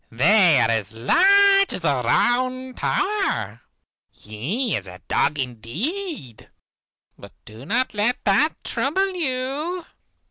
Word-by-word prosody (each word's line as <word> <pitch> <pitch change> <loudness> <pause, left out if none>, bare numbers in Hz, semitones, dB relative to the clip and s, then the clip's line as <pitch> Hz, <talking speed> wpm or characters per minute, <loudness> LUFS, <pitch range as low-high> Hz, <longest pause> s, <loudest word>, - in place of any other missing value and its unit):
They 170 - +4
are 115 -1 +2
as 110 -2 -2
large 395 - +4
as - - -4
the 140 -6 0
Round 255 - 0
Tower. 400 +1 -2 0.5
He 155 - -4
is 100 -2 -5
a 90 0 -10
dog 150 - +1
indeed, 135 - -5 0.7
but - - -13
do 110 +6 -13
not 250 +5 0
let 215 +4 0
that 260 +10 +1
trouble 385 +7 -1
you. 305 +3 -3
240 Hz, 115 wpm, -22 LUFS, -, 0.7 s, They